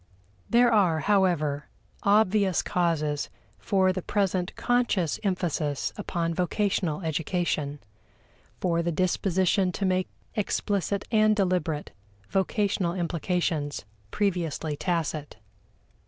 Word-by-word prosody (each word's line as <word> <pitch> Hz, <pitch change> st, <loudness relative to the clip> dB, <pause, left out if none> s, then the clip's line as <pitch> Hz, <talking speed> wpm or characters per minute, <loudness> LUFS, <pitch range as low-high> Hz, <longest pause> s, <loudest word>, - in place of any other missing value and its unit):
There 240 Hz, 0 st, +5 dB
are, 175 Hz, -7 st, +3 dB
however, 170 Hz, -8 st, +1 dB, 0.3 s
obvious 200 Hz, -2 st, +3 dB
causes 160 Hz, -6 st, 0 dB, 0.3 s
for 190 Hz, -3 st, +2 dB
the 185 Hz, -, -3 dB
present 190 Hz, -2 st, -1 dB
conscious 235 Hz, -10 st, +1 dB
emphasis 170 Hz, -8 st, -1 dB
upon 170 Hz, -5 st, -2 dB
vocational 180 Hz, -2 st, 0 dB
education 160 Hz, -2 st, -1 dB, 0.8 s
for 170 Hz, -2 st, +1 dB
the 170 Hz, 0 st, -1 dB
disposition 185 Hz, +2 st, +1 dB
to 200 Hz, -, -2 dB
make 185 Hz, 0 st, +1 dB, 0.2 s
explicit 200 Hz, -2 st, -1 dB
and 215 Hz, -1 st, +4 dB
deliberate 180 Hz, -6 st, 0 dB, 0.4 s
vocational 195 Hz, -2 st, 0 dB
implications 170 Hz, -, -1 dB, 0.2 s
previously 170 Hz, -, -1 dB
tacit. 155 Hz, -, -2 dB
180 Hz, 95 wpm, -27 LUFS, 160-200 Hz, 0.8 s, There